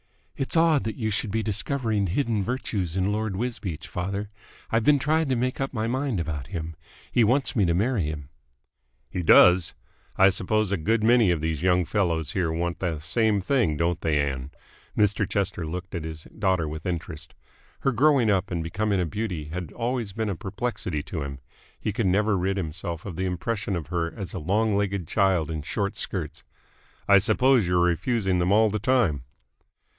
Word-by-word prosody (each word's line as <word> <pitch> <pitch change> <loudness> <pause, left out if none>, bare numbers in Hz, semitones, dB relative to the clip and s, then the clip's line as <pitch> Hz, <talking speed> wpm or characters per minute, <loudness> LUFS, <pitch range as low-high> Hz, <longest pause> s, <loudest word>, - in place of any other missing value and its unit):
"It's 135 +4 -1
odd 160 -3 +4
that 110 - -3
you 110 -3 -2
should 105 +1 -2
be 110 +2 -1
discovering 110 -1 -1
hidden 110 +1 0
virtues 100 -7 -2
in 95 +1 +1
Lord 105 -2 -2
Wisbeach, 105 -7 -4
father. 100 +3 -4 0.4
I've 115 0 +2
been 145 +4 +5
trying 155 +2 +1
to 130 - +2
make 125 +2 -1
up 135 - -1
my 110 -3 -2
mind 130 -2 -1
about 75 -4 -4
him. 80 -3 -5 0.4
He 120 - +4
wants 130 +5 +2
me 105 - +3
to 85 -1 +2
marry 105 - +1
him." 75 -2 -5 0.8
"He 90 - -2
does! 90 +1 +6 0.4
I 95 +1 +7
suppose 100 +2 0
a 100 - +1
good 110 +7 +1
many 115 -3 +5
of 85 -3 +1
these 80 -1 -2
young 90 -1 +3
fellows 85 -5 0
here 85 -3 0
want 85 0 -2
the 85 -4 -1
same 105 +7 +1
thing, 105 - +1
don't 85 +1 0
they, 75 -2 +1
Ann?" 70 -2 -2 0.5
Mr. 105 -2 +2
Chester 95 -5 -1
looked 90 +3 -6
at 85 -4 -3
his 80 -1 -6
daughter 95 -6 -1
with 80 +3 -6
interest. 80 -3 -5 0.5
Her 135 - +2
growing 130 -2 +4
up 100 0 +1
and 85 -2 -2
becoming 100 +4 -1
a 90 - +1
beauty 90 -3 -3
had 85 -1 -5
always 120 -4 -2
been 110 0 -2
a 100 - -2
perplexity 95 -5 -3
to 80 -1 -5
him. 70 -1 -5 0.4
He 110 - -2
could 105 -1 0
never 105 +3 +2
rid 95 +1 0
himself 85 -1 -4
of 95 -5 -6
the 95 - -1
impression 100 +3 -2
of 80 -4 -4
her 85 -1 -1
as 95 -5 -6
a 95 - -3
long 105 +6 +1
legged 100 -4 -1
child 95 -6 +2
in 80 -1 -3
short 100 +7 -2
skirts. - - -4 0.6
"I 100 0 +7
suppose 115 +1 +3
you're 90 0 +2
refusing 95 +2 +1
them 90 +2 +1
all 110 +1 +4
the 105 - -1
time?" 115 - +1
95 Hz, 190 wpm, -25 LUFS, 85-110 Hz, 0.8 s, I